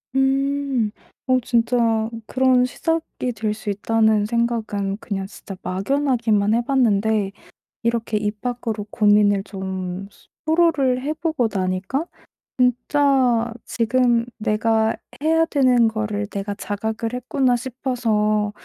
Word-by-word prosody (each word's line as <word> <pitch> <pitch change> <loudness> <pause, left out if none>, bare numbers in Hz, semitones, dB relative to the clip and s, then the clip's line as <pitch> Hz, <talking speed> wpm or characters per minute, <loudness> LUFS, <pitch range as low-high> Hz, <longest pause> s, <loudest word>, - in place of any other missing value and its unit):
음. 270 -3 +1 0.4
어 255 0 +4
진짜 230 -2 +1 0.2
그런 255 -1 +3
'시작이 325 -2 -2
될 215 0 -2
수 215 -1 -6
있다.'는 220 +1 +2
생각은 220 -4 -1
그냥 195 -3 -4
진짜 195 -1 -10
막연하게만 220 0 +1
해 235 - +3
봤는데 220 -6 +2 0.5
이렇게 230 -1 -1
입 210 0 -2
밖으로 235 -4 -3
고민을 205 -2 +3
좀 190 -1 -5
스 - - -24 0.2
토로를 315 -6 +2
해 295 +4 -2
보고 310 -7 0
나니까 190 - -1 0.5
진짜 250 -1 +2
'지금 240 0 +2
내가 220 +1 +1 0.3
해야 325 +1 +3
되는 255 -6 +3
거를 215 -2 -2
내가 200 0 -4
자각을 220 +3 -3
했구나.' 250 0 +1
싶어서 230 -5 0
230 Hz, 240 characters per minute, -22 LUFS, 210-255 Hz, 0.5 s, 어